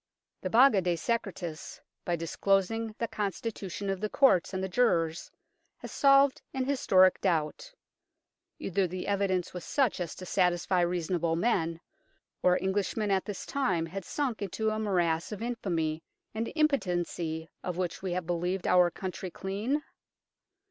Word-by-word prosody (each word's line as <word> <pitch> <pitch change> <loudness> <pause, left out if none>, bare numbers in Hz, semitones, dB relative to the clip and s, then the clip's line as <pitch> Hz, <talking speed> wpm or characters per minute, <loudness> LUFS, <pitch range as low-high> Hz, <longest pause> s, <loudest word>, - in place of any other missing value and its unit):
The - - -2
Baga 235 -4 +6
de 175 -1 +1
Secretis, 175 -4 -3 0.3
by 175 - +1
disclosing 195 +6 0
the 230 - -1
constitution 205 -2 -4
of 195 -1 -2
the 215 - -1
Courts 260 -11 +4
and 190 -1 -3
the - - 0
jurors, 175 -7 +1 0.5
has - - -9
solved 275 -1 +4
an 260 -1 0
historic 190 -9 +4
doubt. 170 - -1 0.9
Either 195 0 0
the 180 +1 -5
evidence 195 -3 0
was 180 -2 -6
such 265 -9 +1
as 175 - -4
to 185 - -8
satisfy 180 0 +2
reasonable 170 -1 0
men, 170 -4 0 0.6
or 180 0 +4
Englishmen 200 +2 -1
at 190 -1 +1
this 205 -3 -5
time 190 -13 0
had 190 +4 -6
sunk 255 - -2
into 215 +3 -1
a 215 - -2
morass 175 -5 0
of 210 +1 -5
infamy 170 -10 -2 0.3
and 225 +1 -3
impotency 175 - 0 0.2
of 180 -2 -3
which 180 -2 -2
we 185 -2 -2
had 180 -1 -2
believed 175 +2 -1
our 180 -1 +5
country 185 +1 -5
clean. 210 - -2
190 Hz, 150 wpm, -29 LUFS, 175-220 Hz, 0.9 s, Baga